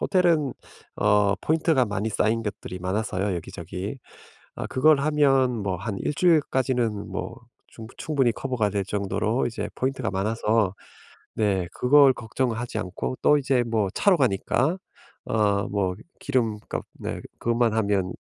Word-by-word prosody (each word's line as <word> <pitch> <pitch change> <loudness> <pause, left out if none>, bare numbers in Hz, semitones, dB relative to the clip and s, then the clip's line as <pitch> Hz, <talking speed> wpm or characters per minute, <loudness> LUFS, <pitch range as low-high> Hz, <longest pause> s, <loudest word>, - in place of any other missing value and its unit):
호텔은 170 -7 +2 0.4
어 105 -1 +3
포인트가 155 -4 +2
많이 105 -1 -2
쌓인 110 +2 +1
것들이 95 -3 -6
많아서요, 95 +1 -1
여기저기. 95 +6 -6 0.6
아 - - -5
그걸 150 +2 +4
하면 135 -6 +2
뭐 95 -2 -1
한 100 +2 -4
1 150 - -2
주일까지는 130 - +1
뭐 - - -5 0.3
충부 115 +2 -12
충분히 135 -6 +1
커버가 120 -5 -1
될 100 -1 -1
정도로 105 +4 -1
이제 105 -3 -4
포인트가 130 -4 -2
많아서 105 0 0 0.6
네 95 -5 0
그걸 140 +1 +5
걱정하지 120 0 -3
않고 100 +6 -4
또 150 - +5
이제 135 -3 +1
뭐 110 -4 0
차로 195 -4 +3
가니까 130 - +1 0.5
어 100 -2 +1
뭐 95 -3 -1 0.2
기름값 115 -6 -2
네 - - -5 0.2
그것만 120 -1 +1
하면 100 -4 0
115 Hz, 280 characters per minute, -25 LUFS, 100-130 Hz, 0.6 s, 그걸